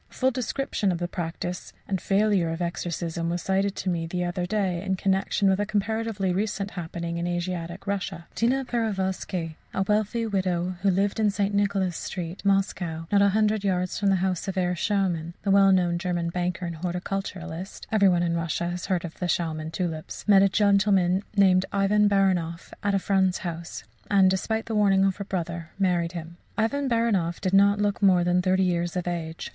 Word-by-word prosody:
A - - -21
full 260 0 +2
description 245 -4 -1
of 175 - -1
the 175 0 -2
practice 175 +1 -5
and 190 -2 -2
failure 195 -4 +2
of 165 +1 -3
exorcism 170 -1 -3
was 175 0 -2
cited 195 +1 0
to 190 - -2
me 165 -1 -2
the 180 +1 -2
other 175 0 -2
day 190 -4 0
in 190 0 -1
connexion 195 +1 +1
with 190 0 +3
a 205 - +1
comparatively 215 -2 -1
recent 200 0 -2
happening 170 -1 -5
in 170 - -2
Asiatic 175 0 -3
Russia: 195 -4 -3
Tina 260 +4 +1
Peroviskei, 190 -7 -2 0.2
a 195 - +2
wealthy 210 +3 0
young 225 -2 -3
widow, 185 -2 0
who 200 - +3
lived 195 +3 +1
in 215 -1 +3
St. 200 0 -1
Nicholas 200 -3 +1
Street, 175 -1 -5
Moscow 185 -4 0
not 200 -1 +4
a 200 - +5
hundred 215 0 +1
yards 185 -2 0
from 200 -1 +2
the 195 - +4
house 185 +1 -2
of 195 - -3
Herr 180 -1 +1
Schauman, 175 -3 -1
the 200 - +1
well 195 0 +6
known 175 -2 +2
German 175 -2 -1
banker 180 +1 -2
and 170 -1 -5
horticulturist 180 0 -5
(every 200 -3 +5
one 175 -1 +2
in 170 -1 0
Russia 170 +1 -1
has 175 0 -5
heard 180 -3 0
of 165 - -9
the 180 - -1
Schauman 160 -2 -1
tulips) 165 -1 -4
met 200 -2 +7
a 195 - +5
gentleman 195 -2 +3 0.2
named 190 -1 +4
Ivan 205 +1 +3
Baranoff 180 -4 0
at 200 -1 +1
a - - +4
friend's 190 -1 +2
house, 170 -1 -5 0.3
and, 195 -2 +5
despite 220 +4 -1
the 225 - -4
warning 195 -2 +4
of 195 -1 0
her 200 - -4
brother, 170 -3 -4
married 180 -3 +1
him. 170 0 -7 0.2
Ivan 270 +5 0
Baranoff 210 -8 +1
did 190 -1 -2
not 200 +1 +5
look 205 0 0
more 185 -3 +5
than 180 +1 +2
thirty 185 +1 +2
years 175 -1 0
of 180 -1 -2
age. 165 -2 -4
190 Hz, 195 wpm, -26 LUFS, 175-200 Hz, 0.3 s, met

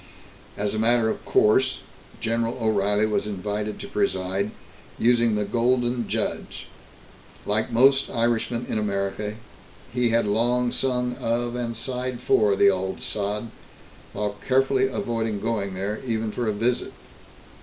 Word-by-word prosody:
As 105 0 -1
a 110 - -1
matter 115 0 +3
of - - -4
course, 130 +3 +3 0.4
General 115 +1 -1
O'Reilly 105 -1 +2
was 105 -1 0
invited 105 +1 -3
to - - -7
preside, 95 +2 -1 0.5
using 120 -2 +3
the 105 0 0
Golden 120 +2 +1
Judge. - - -3 0.8
Like 110 +3 0
most 135 +4 +4
Irishmen 120 0 0
in 110 - -1
America, 100 0 -2 0.6
he 125 -1 +2
had 115 0 +2
long 120 +4 +1
sung 125 -1 0
of 120 +1 -1
and 120 -2 -3
sighed 125 0 -3
for 105 -2 +3
the 100 0 +6
Auld 95 0 -3
Sod, 105 +2 -2 0.6
while 105 -1 -3
carefully 135 0 +3
avoiding 115 -4 -2
going 100 -3 -2
there, 100 +3 -2
even 110 -3 -1
for 120 +1 -2
a - - +2
visit. 115 +4 -1
115 Hz, 135 wpm, -25 LUFS, 105-120 Hz, 0.8 s, the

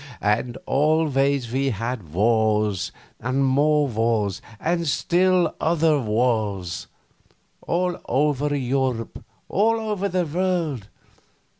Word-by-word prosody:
And 115 +4 0
always 140 -4 +1
we 135 +2 +1
had 115 - -4
wars, 105 0 +1 0.3
and 130 +3 0
more 145 +2 +3
wars, 110 -4 0 0.2
and 170 0 -1
still 180 +4 +2
other 160 -2 +2
wars 105 -6 -1 0.7
all 180 +1 -1
over 145 +1 +1
Europe, 130 -3 -2 0.2
all 225 +3 +2
over 210 -3 -2
the 180 -1 0
world. 165 - -1
135 Hz, 100 wpm, -23 LUFS, 115-165 Hz, 0.7 s, more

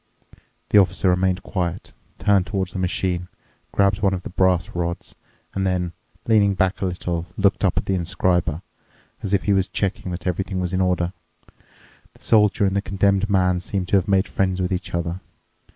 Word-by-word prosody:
The 105 - +6
Officer 95 0 +2
remained 90 0 +1
quiet, 90 -2 -3 0.2
turned 100 -3 +2
toward 95 -1 -2
the 95 - -5
machine, 90 -1 -1 0.4
grabbed 100 +1 +2
one 95 -2 +2
of 90 - -6
the 110 - -7
brass 95 -2 +2
rods, 85 0 -3 0.4
and 95 - -1
then, 90 -2 -1 0.3
leaning 105 -3 +4
back 95 +3 0
a 95 - +1
little, 85 -1 -3
looked 100 0 +2
up 95 - +2
at - - +1
the 95 - 0
inscriber, 90 -2 0 0.6
as 100 - -4
if 100 - +2
he 100 - +2
was 95 0 +2
checking 95 -1 -2
that 90 0 -6
everything 95 +1 -2
was 90 -1 -2
in 95 - +1
order. 90 -1 +1 1.0
The - - -21
Soldier 105 -2 +4
and 95 0 0
the 100 - +2
Condemned 100 +1 +1
Man 90 -2 +2
seemed 90 0 -3
to - - +3
have 95 - 0
made 95 0 +2
friends 95 -1 0
with 90 0 0
each 90 - -3
other. 85 +1 -2
95 Hz, 185 wpm, -22 LUFS, 90-100 Hz, 1.0 s, The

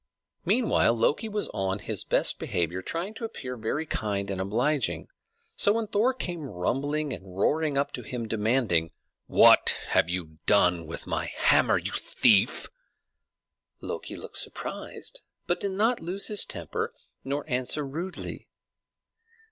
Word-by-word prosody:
Meanwhile 230 - +3
Loki 150 - +1
was 210 0 -1
on 95 0 -1
his - - -2
best - - 0
behavior, 90 +1 -1
trying 170 - -3
to 225 - -9
appear 130 - -5
very 120 +7 -2
kind 100 -7 -2
and 95 -1 -2
obliging; 125 +8 0 0.5
so 205 - +4
when 230 0 0
Thor 215 +5 +2
came 175 -10 -4
rumbling 140 +10 -1
and 95 -1 -9
roaring 150 +6 +1
up 140 +1 +1
to 125 - -5
him, 120 0 -5
demanding, 105 -7 +1 0.3
"What - - +6
have 80 - +3
you 80 -3 -4
done 90 -5 +4
with 80 - -7
my - - -1
hammer, - - +3
you - - -3
thief?" 100 -3 +3 1.1
Loki - - -5
looked - - -6
surprised, - - -4 0.2
but 175 - +1
did 200 -1 -2
not 225 +5 +2
lose 180 +4 -2
his 210 -1 +2
temper 460 +1 -4 0.3
nor 140 +2 -3
answer 130 +2 -1
rudely. 170 +7 -6
135 Hz, 140 wpm, -27 LUFS, -, 1.1 s, What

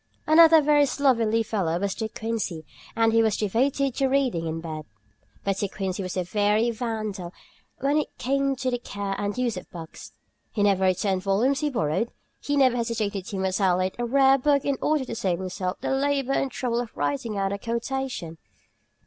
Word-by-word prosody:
Another 320 0 +7
very 290 -1 +4
slovenly 230 -5 +2
fellow 190 -7 -1
was 200 0 -1
De 220 -2 -4
Quincey, 215 -9 -4 0.3
and 225 0 +3
he 230 - +5
was 220 -2 +2
devoted 260 +6 +1
to 270 +1 +1
reading 260 -12 +1
in 160 0 -3
bed. 155 -2 -6 0.6
But 195 -1 0
De 200 - 0
Quincey 190 -1 -4
was 185 0 -4
a 180 - +1
very 210 +5 +1
vandal 215 -6 -4 0.5
when 280 +3 +2
it - - -5
came 275 +1 0
to 260 0 -2
the 245 - -1
care 200 -4 -4
and 205 +1 -2
use 245 -5 0
of 180 - -9
books. 165 -2 -10 0.4
He 205 - -1
never 195 -2 +3
returned 185 +1 +1
volumes 220 +8 +1
he 300 - 0
borrowed, 225 - 0
and - - -25 0.3
he 285 0 -1
never 260 -3 +4
hesitated 215 -5 -2
to 200 - -4
mutilate 185 -1 +1
a 240 - 0
rare 270 +2 +4
book 280 +1 +2
in 280 -2 0
order 300 -3 +1
to - - -6
save 190 -6 -1
himself 185 0 -4
the - - -2
labor 275 0 +1
and 275 - 0
trouble 240 -2 -2
of 235 - -9
writing 145 +10 -2
out 195 0 0
a 200 - -4
quotation. 235 -7 -4
225 Hz, 190 wpm, -25 LUFS, 190-265 Hz, 0.6 s, Another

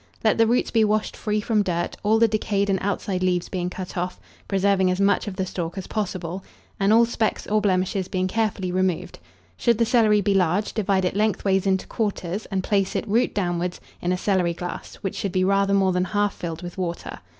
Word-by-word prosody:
Let 220 0 +3
the 225 - +5
roots 240 +2 +1
be 225 -2 +4
washed 215 0 0
free 210 0 -1
from 215 0 +1
dirt, 175 -3 -2
all 215 +2 +3
the 230 0 +5
decayed 205 -2 0
and 190 - +1
outside 195 -1 -2
leaves 180 -1 0
being 180 -2 -2
cut 185 0 -7
off, 180 0 -3 0.3
preserving 195 -1 +2
as 185 +1 0
much 200 +2 +2
of 200 - -4
the 190 0 -1
stalk 175 -1 -4
as 190 - -4
possible, 185 -3 -3 0.4
and 200 +1 +3
all 230 +2 +6
specks 230 -1 -1
or 215 0 +1
blemishes 190 -1 0
being 185 -1 -1
carefully 200 -3 -1
removed. 185 -2 -1 0.4
Should 235 -2 +2
the 230 - +3
celery 220 -3 +4
be 200 +1 +1
large, 190 +2 +1
divide 195 -3 +1
it 180 - -1
lengthwise 200 -2 +1
into 190 -1 +1
quarters, 200 -2 -3
and 190 -2 -2
place 195 -1 0
it, - - -2
root 230 +5 +1
downwards, 175 -2 -1 0.2
in 175 - 0
a 180 - +1
celery 180 -3 +1
glass, 175 +1 -6
which 195 - -3
should 200 - -2
be 185 0 +1
rather 195 +1 +3
more 190 -1 +3
than 180 0 +1
half 205 +1 0
filled 170 0 -6
with 175 +2 -7
water. 175 -2 -4
195 Hz, 215 wpm, -24 LUFS, 180-210 Hz, 0.4 s, all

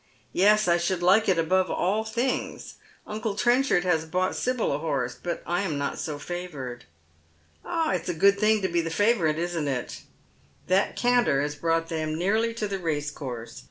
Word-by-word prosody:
'* - - -37
Yes, 215 0 +5
I 170 0 +4
should 175 +1 -1
like 200 +5 +4
it 185 - +3
above 185 +3 +2
all 205 +5 0
things. 235 +4 -3 0.3
Uncle 215 -1 -3
Trenchard 240 -5 +3
has 170 -4 +1
bought 185 +3 -1
Sibyl 250 -2 0
a 140 - -1
horse. 135 -6 -1
But 170 +7 -5
I 175 +2 0
am 165 -7 -2
not 140 0 -3
so 155 -3 -4
favoured." 145 -7 -6 0.4
" 80 -1 -36
Ah, 325 -1 -1
it's 180 -1 -2
a 175 - -1
good 200 +4 +4
thing 215 -1 +3
to - - +2
be 170 -1 +1
the 165 - -3
favourite, 175 -4 +2
isn't 170 -3 -2
it? 125 -3 -3 0.3
" 70 +1 -34
That 190 +2 +2
canter 245 - +3
has 145 0 -2
brought 165 +2 0
them 155 -1 -2
nearly 215 +6 +1
to 215 -2 -2
the 195 -1 -3
racecourse. 145 -7 -4
175 Hz, 195 wpm, -26 LUFS, 155-205 Hz, 0.4 s, Yes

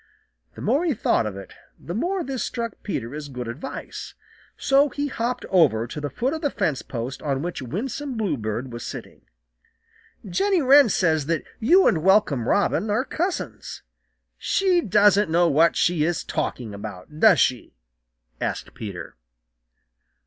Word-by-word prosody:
The - - -9
more 270 - +2
he 320 -7 +1
thought 115 - +1
of 100 -2 -6
it, 100 - -10 0.3
the 170 - -7
more 355 - -1
this 265 -5 -4
struck 230 0 -3
Peter 125 - -4
as 150 -1 -6
good 125 -3 -6
advice. 120 +7 -7 0.4
So 275 +2 +3
he 285 +2 -3
hopped 245 0 -3
over 140 -12 +4
to 150 +5 -7
the 145 - -3
foot 250 - -1
of 320 - -4
the 290 - +1
fence 160 - -1
post 125 +2 -6
on 140 -1 -2
which 175 -4 -4
Winsome 250 - -4
Bluebird 125 - -2
was 120 - -6
sitting. - - -8 1.1
"Jenny 385 - +1
Wren 280 -2 +6
says 160 -7 +1
that 165 -2 0 0.2
you 350 - +5
and 165 - +3
Welcome 180 - +3
Robin 205 +1 +1
are 225 +6 +1
cousins. 350 +5 -4 0.6
She 370 -3 +2
doesn't 205 - +4
know 170 +2 +3
what 165 +2 +4
she 170 -3 +2
is 170 +1 0
talking 115 -5 -3
about, 100 +7 -9
does 205 -5 +6
she?" 125 -2 0 0.7
asked - - -3
Peter. 95 -6 -7
175 Hz, 155 wpm, -24 LUFS, -, 1.1 s, Wren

